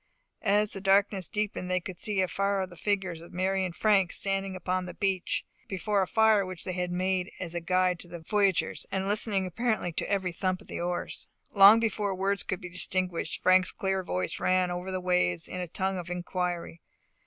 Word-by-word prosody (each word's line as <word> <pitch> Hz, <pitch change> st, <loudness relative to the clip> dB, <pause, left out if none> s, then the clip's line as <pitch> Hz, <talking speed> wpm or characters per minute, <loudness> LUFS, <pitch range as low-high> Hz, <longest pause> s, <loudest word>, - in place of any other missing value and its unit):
As 210 Hz, 0 st, +3 dB
the 195 Hz, -, -5 dB
darkness 195 Hz, -1 st, +3 dB
deepened 210 Hz, -3 st, -3 dB
they 185 Hz, 0 st, +2 dB
could 180 Hz, 0 st, -8 dB
see 205 Hz, -3 st, 0 dB
afar 195 Hz, +2 st, 0 dB
off 185 Hz, -, -6 dB
the -, -, -11 dB
figures 190 Hz, -3 st, -1 dB
of 170 Hz, -, -13 dB
Mary 190 Hz, +1 st, 0 dB
and 175 Hz, -2 st, -3 dB
Frank 195 Hz, -4 st, +3 dB
standing 195 Hz, -1 st, -2 dB
upon 185 Hz, 0 st, -2 dB
the -, -, -8 dB
beach, 190 Hz, -2 st, -1 dB, 0.2 s
before 200 Hz, +1 st, 0 dB
a 190 Hz, -, 0 dB
fire 220 Hz, -1 st, +4 dB
which 185 Hz, -2 st, -7 dB
they -, -, -3 dB
had 180 Hz, 0 st, -2 dB
made 185 Hz, +1 st, 0 dB
as 170 Hz, -2 st, -4 dB
a 175 Hz, -, -2 dB
guide 180 Hz, +1 st, +2 dB
to -, -, -8 dB
the 175 Hz, 0 st, -7 dB
voyagers, 195 Hz, +2 st, +1 dB
and 190 Hz, 0 st, -1 dB
listening 205 Hz, -2 st, +1 dB
apparently 215 Hz, -1 st, -1 dB
to -, -, -3 dB
every 190 Hz, -2 st, 0 dB
thump 185 Hz, +1 st, -1 dB
of -, -, -15 dB
the -, -, -6 dB
oars. 175 Hz, 0 st, -3 dB, 0.2 s
Long 200 Hz, +2 st, +9 dB
before 210 Hz, -3 st, -1 dB
words 195 Hz, +1 st, 0 dB
could 185 Hz, -, -3 dB
be 180 Hz, -, -7 dB
distinguished, 180 Hz, 0 st, -2 dB
Frank's 185 Hz, 0 st, +5 dB
clear 190 Hz, -1 st, -1 dB
voice 90 Hz, -, -3 dB
rang 185 Hz, -1 st, +2 dB
over 180 Hz, +1 st, -4 dB
the 185 Hz, 0 st, -2 dB
waters 180 Hz, -, +1 dB
in 180 Hz, -, -5 dB
a 180 Hz, -, -4 dB
tone 190 Hz, +3 st, -1 dB
of 175 Hz, 0 st, -7 dB
inquiry. 180 Hz, -1 st, -3 dB
185 Hz, 205 wpm, -29 LUFS, 180-195 Hz, 0.2 s, Long